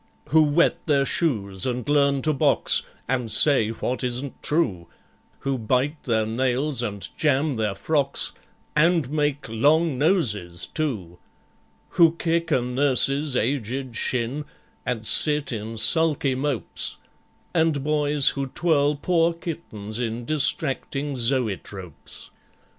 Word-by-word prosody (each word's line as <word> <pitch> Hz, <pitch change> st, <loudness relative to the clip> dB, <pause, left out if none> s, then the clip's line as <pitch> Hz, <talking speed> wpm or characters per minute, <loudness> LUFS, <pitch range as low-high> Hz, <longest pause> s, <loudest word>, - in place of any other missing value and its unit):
Who 160 Hz, +1 st, +5 dB
wet 155 Hz, +3 st, +2 dB
their 140 Hz, -3 st, +2 dB
shoes 100 Hz, -, 0 dB
and 125 Hz, -2 st, -3 dB
learn 140 Hz, -2 st, +2 dB
to 155 Hz, -, +1 dB
box, 135 Hz, -, +2 dB, 0.3 s
And 125 Hz, -3 st, -2 dB
say 115 Hz, -1 st, +5 dB
what 125 Hz, +3 st, -3 dB
isn't 125 Hz, +2 st, -2 dB
true, 105 Hz, -, 0 dB, 0.5 s
Who 135 Hz, -2 st, -2 dB
bite 130 Hz, +7 st, -1 dB
their 110 Hz, -3 st, +1 dB
nails 130 Hz, +4 st, 0 dB
and 100 Hz, -4 st, -4 dB
jam 145 Hz, -1 st, +1 dB
their 105 Hz, -3 st, -2 dB
frocks, 140 Hz, +6 st, 0 dB, 0.4 s
And 165 Hz, -3 st, +2 dB
make 145 Hz, -2 st, -1 dB
long 145 Hz, +6 st, +2 dB
noses 105 Hz, -, 0 dB
too; 105 Hz, -, -4 dB, 0.7 s
Who 165 Hz, -2 st, +4 dB
kick 165 Hz, 0 st, -1 dB
a 135 Hz, -5 st, +2 dB
nurse's 135 Hz, +2 st, +1 dB
aged 130 Hz, 0 st, -2 dB
shin, 125 Hz, +5 st, -2 dB, 0.4 s
And 115 Hz, -3 st, -2 dB
sit 150 Hz, +4 st, +4 dB
in 115 Hz, 0 st, -5 dB
sulky 145 Hz, +3 st, +3 dB
mopes; 130 Hz, -6 st, -2 dB, 0.6 s
And 160 Hz, -4 st, +1 dB
boys 150 Hz, -1 st, +3 dB
who 140 Hz, -1 st, -3 dB
twirl 150 Hz, 0 st, +1 dB
poor 170 Hz, +2 st, +1 dB
kittens 115 Hz, -, -6 dB
in 115 Hz, 0 st, -3 dB
Distracting 145 Hz, 0 st, +1 dB
zoëtropes. 110 Hz, -, -3 dB
135 Hz, 120 wpm, -23 LUFS, 115-150 Hz, 0.7 s, Who